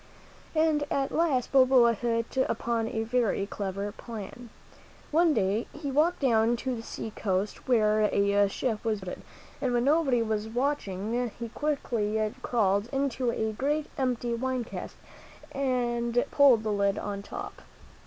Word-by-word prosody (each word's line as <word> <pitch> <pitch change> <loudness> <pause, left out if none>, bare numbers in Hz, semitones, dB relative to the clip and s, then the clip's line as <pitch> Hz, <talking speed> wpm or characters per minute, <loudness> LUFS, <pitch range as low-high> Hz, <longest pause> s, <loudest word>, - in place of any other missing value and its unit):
And 310 -2 +3
at 275 -1 0
last 295 -7 +1
Balboa 255 -3 +6
hit 230 +1 -2
upon 230 -1 -1
a 225 -2 -2
very 230 -4 0
clever 200 0 -4
plan. 230 +2 -9 0.6
One 330 +2 +4
day 205 +2 0
he 290 -2 -5
walked 315 +6 +2
down 230 -3 +3
to 255 +2 -3
the 225 - -6
sea 225 -1 -6
coast, 195 0 -2
where 215 -3 +3
a 200 -1 +3
ship 220 +1 -2
was 220 -3 -1
being 185 - -6
loaded, - - -16 0.4
and 255 -3 0
when 240 - +2
nobody 275 -4 +3
was 215 -1 -2
watching 235 -2 -1
he 235 -1 -5
quickly 220 -7 -1
crawled 205 -3 +1
into 270 -2 0
a 220 -1 -2
great 290 +6 -1
empty 245 -4 -1
wine 255 +1 -1
cask - - -8 0.5
and 245 -2 0
pulled 265 -6 +5
the 215 - -1
lid 200 -1 +1
on 200 -1 -4
the 200 - -15
top. - - -7
235 Hz, 155 wpm, -28 LUFS, 215-260 Hz, 0.6 s, Balboa